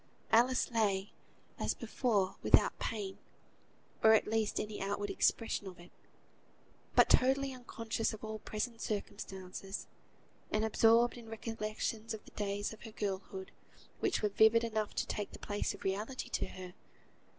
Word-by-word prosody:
Alice 245 +3 +4
lay, 205 -3 +1 0.5
as - - 0
before, 200 -7 0
without - - +4
pain, 205 -4 -3 0.8
or 220 0 +8
at 220 - +5
least 220 -1 0
any 210 0 -4
outward 205 +1 -1
expression 225 -3 +1
of 180 -2 -9
it; 175 +1 -14 1.0
but - - +7
totally 270 +1 +4
unconscious 230 -3 -2
of 220 - -9
all 220 0 -4
present 225 +3 -4
circumstances, 195 -1 -4 0.6
and 215 +1 +1
absorbed 230 +2 +5
in 230 -2 -10
recollections 225 0 -3
of 215 - -12
the - - -14
days 205 +1 -2
of 215 - -13
her 225 - -9
girlhood, 195 -2 -4 0.5
which 370 - 0
were 210 - +3
vivid 220 +3 +5
enough 220 -2 -1
to - - 0
take 205 -1 -4
the - - -7
place 205 0 -2
of - - -13
realities 210 +7 -2
to - - 0
her. 185 -1 -9
215 Hz, 150 wpm, -34 LUFS, 200-225 Hz, 1.0 s, or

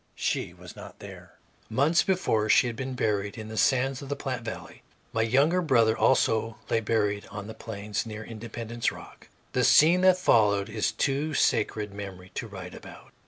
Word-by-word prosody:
She - - -2
was - - -13
not - - -11
there. - - -12 0.4
Months 145 +9 +3
before 115 - 0
she - - +5
had 120 -2 -3
been 130 +2 -5
buried 105 -4 -1
in 110 0 -7
the 110 - -7
sands 130 +4 +1
of 140 - -9
the 145 - -1
Platte 130 -4 -4
valley. 110 -1 -8 0.3
My 110 - +1
younger 140 +10 +3
brother 115 -8 +3
also 115 -3 +2
lay 115 - +3
buried 105 -2 -1
on 105 -1 -7
the 110 - -8
Plains, 105 -2 -4
near 110 -1 -7
Independence 115 +1 -4
Rock. - - -13 0.3
The - - +2
scene 170 +4 +6
that 185 -1 +5
followed 105 - +3
is 110 0 0
of - - -10
too 145 +3 0
sacred 105 -2 0
memory 95 -2 -8
to 115 - -4
write 95 -4 -9
about. - - -13
115 Hz, 185 wpm, -27 LUFS, 105-130 Hz, 0.4 s, scene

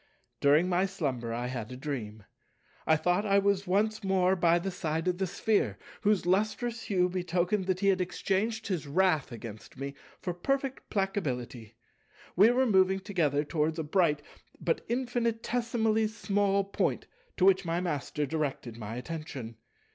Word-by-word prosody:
During 150 +5 +4
my 185 +1 +2
slumber 135 -11 -3
I 120 +1 -2
had 125 -2 -4
a 125 - -7
dream. 115 -7 -5 0.6
I 160 - +6
thought 180 +5 +1
I 200 -1 +3
was 200 -1 +2
once 215 +3 +1
more 190 -1 +3
by 170 -1 +4
the 190 +3 -2
side 160 -1 -2
of 180 0 0
the 190 - 0
Sphere, 175 - 0 0.2
whose 205 -4 +2
lustrous 215 +5 0
hue 180 -3 +2
betokened 180 +2 0
that 185 0 0
he 200 - +4
had 190 -1 +2
exchanged 200 +5 -1
his 180 -7 -2
wrath 160 -2 +2
against 115 0 -9
me 140 +1 -4 0.3
for 180 - -3
perfectly 270 +8 -2
placability. 130 - -2 0.6
We 205 +5 +7
were 255 +2 +3
moving 190 -3 +4
together 165 -8 0
towards 155 +1 -1
a 160 - -1
bright 150 -2 +2 0.4
but 165 - 0
infinitesimally 235 -2 0
small 200 -2 +1
Point, 195 - -1 0.3
to 185 - +3
which 195 0 +5
my 170 0 -1
Master 150 -4 -2
directed 140 -6 -3
my 110 +1 -5
attention. 130 -5 -6
180 Hz, 155 wpm, -30 LUFS, 145-200 Hz, 0.6 s, We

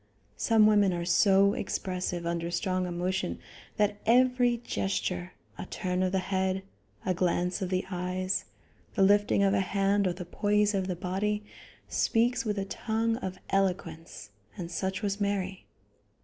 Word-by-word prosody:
Some 220 -2 +4
women 205 -3 +4
are 170 0 -2
so 195 +2 +4
expressive 180 -2 -3
under 170 0 -2
strong 185 0 -1
emotion 180 +2 -2 0.4
that 210 0 +1
every 250 0 +4
gesture, 95 - -2 0.3
a - - -5
turn 180 0 -2
of 185 -1 +1
the 190 - +1
head, 190 0 -1 0.4
a 185 - +2
glance 180 +1 0
of 185 - -2
the 185 0 0
eyes, 185 +1 -2 0.5
the 195 - +4
lifting 205 0 +4
of 195 0 +3
a 200 - +3
hand 195 +1 +1
or 180 - 0
the 180 0 -7
poise 210 +3 +1
of 190 -2 0
the 180 - -2
body, 205 +4 -2 0.4
speaks 240 +3 +1
with 210 -1 -1
a 195 - -1
tongue 225 +3 -1
of 190 -6 -5
eloquence, 165 - -2 0.3
and 170 -1 -5
such 190 +3 -2
was 200 0 -1
Mary. 195 -2 -2
190 Hz, 155 wpm, -29 LUFS, 180-205 Hz, 0.5 s, Some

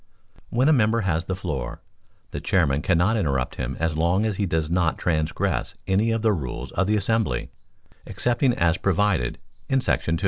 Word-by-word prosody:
When 125 +4 +2
a 155 - +6
member 115 -3 +3
has 85 -4 0
the 95 - -2
floor, 80 -10 -4 0.5
the - - -5
chairman 75 -6 +2
cannot 95 +7 +2
interrupt 70 - -1
him 65 0 -3
as 80 -1 0
long 85 +6 +2
as 105 -4 -1
he 100 - 0
does 80 -2 0
not 85 0 +1
transgress 80 -3 -1
any 100 +4 +2
of 115 -1 0
the 110 -2 +4
rules 70 -9 -5
of 90 - 0
the 105 +1 +2
assembly, 100 - 0 0.6
excepting 125 +1 +1
as 85 0 +2
provided 95 -8 +1 0.3
in 135 - +3
§ - - 0
2. 85 0 0
90 Hz, 180 wpm, -24 LUFS, 80-110 Hz, 0.6 s, a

